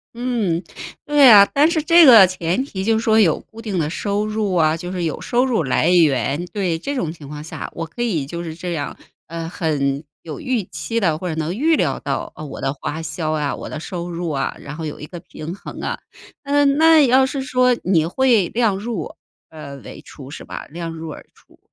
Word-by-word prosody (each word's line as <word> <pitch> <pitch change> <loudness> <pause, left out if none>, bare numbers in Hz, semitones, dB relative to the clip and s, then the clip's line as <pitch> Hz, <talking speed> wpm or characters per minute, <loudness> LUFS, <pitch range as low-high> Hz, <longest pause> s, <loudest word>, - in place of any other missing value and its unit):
嗯， 225 -9 -1 0.4
对 290 -2 +6
啊， 205 -3 +9
但 295 +3 +4
是 320 -3 0
这 335 0 +7
个 225 -7 +9
前 180 +5 -1
提 190 -9 -5
就 225 +2 +2
是 225 - -3
说 220 0 +4
有 170 -8 +3
固 225 0 -14
定 205 -5 -3
的 155 -2 0
收 205 +4 -2
入 215 -3 -1
啊， 155 -2 +3
就 175 +2 -6
是 180 -2 -3
有 160 - -2
收 245 +1 +1
入 240 -10 0
来 145 +5 +1
源， 155 -2 +2
对， 180 -5 -2
这 285 +11 -4
种 170 - -2
情 155 -4 -12
况 150 +1 -8
下， 160 - -7
我 165 - -4
可 165 +9 -8
以 180 -12 0
就 170 +5 -6
是 160 -1 -6
这 175 +1 -5
样， 145 -3 -4 0.3
呃， 165 0 -5
很 145 -5 -1 0.2
有 155 -3 -7
预 250 -5 -1
期 170 +8 -4
地 165 -6 +1
或 180 - -5
者 160 - -3
能 160 +3 -2
预 315 +6 +2
料 - - 0
到， - - -4
呃， 155 - -8
我 145 - -8
的 135 0 -1
花 145 +3 -5
销 155 0 -3
啊、 150 -2 -1
我 - - -8
的 155 - -6
收 175 +1 -6
入 170 0 -4
啊， 140 -3 -2
然 145 +1 -8
后 160 0 -5
有 150 - -6
一 150 - -7
个 175 +2 -9
平 160 0 -8
衡 195 - -9
啊。 - - -3 0.4
啊， 290 0 +2
那 310 +3 +5
要 260 +2 +4
是 265 0 -3
说 255 -1 +2
你 165 -4 +2
会 230 0 +2
量 220 -3 0
入， 220 -2 -5 0.4
呃 150 -3 -9
为 - - -10
出 135 -1 -12
是 - - -8
吧？ - - -7
量 165 +1 -6
入 160 -1 -7
而 - - -10
出， - - -25
175 Hz, 245 characters per minute, -20 LUFS, 155-230 Hz, 0.4 s, 啊